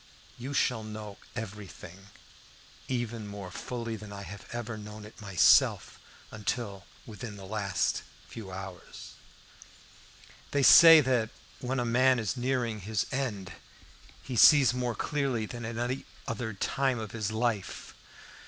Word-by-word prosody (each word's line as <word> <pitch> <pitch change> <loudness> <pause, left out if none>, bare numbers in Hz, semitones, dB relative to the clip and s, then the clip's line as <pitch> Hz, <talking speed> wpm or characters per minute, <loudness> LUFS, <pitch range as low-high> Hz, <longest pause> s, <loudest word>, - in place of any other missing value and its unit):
You 130 +4 -6
shall 125 -6 +1
know 105 -1 -8 0.2
everything, 100 -3 -8 0.8
even 120 -4 -3
more 100 -3 -8
fully 115 +2 -5
than 105 -1 -10
I 100 0 -7
have 100 0 -10
ever 120 -1 -4
known 105 0 -9
it 110 - -14
myself 95 -5 +4 0.3
until 105 -2 -4 0.2
within 105 -1 -8
the 95 - -10
last 100 -1 -1 0.3
few 105 -5 -9
hours. 95 -1 -9 1.4
They 140 -1 +1
say 165 +2 +10
that 125 -5 +1 0.3
when 130 +1 -2
a 120 - 0
man 130 +2 +4
is 115 +1 -2
nearing 120 -3 -1
his 105 +2 -1
end 120 -9 -3 0.7
he 130 - -5
sees 135 +1 +7
more 125 -2 -2
clearly 135 -4 -1
than 120 +1 -7
at 115 0 -5
any 125 +3 -2 0.2
other 115 -2 -3
time 130 +6 0
of 110 -2 -6
his 110 -2 -3
life. 110 -3 -2
110 Hz, 135 wpm, -29 LUFS, 105-125 Hz, 1.4 s, say